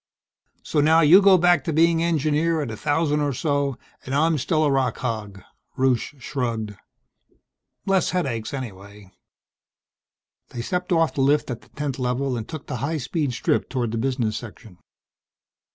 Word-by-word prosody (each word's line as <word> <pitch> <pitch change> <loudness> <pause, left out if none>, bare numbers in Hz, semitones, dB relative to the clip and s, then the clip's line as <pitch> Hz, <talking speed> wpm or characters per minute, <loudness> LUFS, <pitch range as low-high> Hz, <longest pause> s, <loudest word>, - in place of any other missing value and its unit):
"So 150 - -1
now 160 +2 +5
you 170 +6 +7
go 195 -1 +6
back 175 -4 +3
to 165 - -2
being 165 +1 +3
engineer 160 0 +1
at 125 - -5
a - - -5
thousand 150 +4 0
or 145 -1 0
so, 140 -1 -1 0.3
and 130 - -4
I'm 160 +1 +2
still 155 +4 +1
a 145 - +2
rock 135 -2 0
hog." 105 -6 -5 0.3
Rusche 130 +1 0
shrugged. 115 -5 -3 1.1
"Less 195 -2 +2
headaches 120 -12 -2
anyhow." 100 -6 -8 1.4
They 120 - -6
stepped 180 +6 -3
off 165 -2 +2
the 135 - -1
lift 145 0 +2
at 120 - -6
the - - -22
10th 140 -3 -4
Level 125 +1 -1
and 115 -2 -5
took 155 -3 -7
the 125 - -4
high 145 +7 -2
speed 145 0 -2
strip - - 0
toward 125 -4 -2
the 115 - -2
business 120 -4 -1
section. 110 -4 -11
140 Hz, 165 wpm, -23 LUFS, 120-160 Hz, 1.4 s, you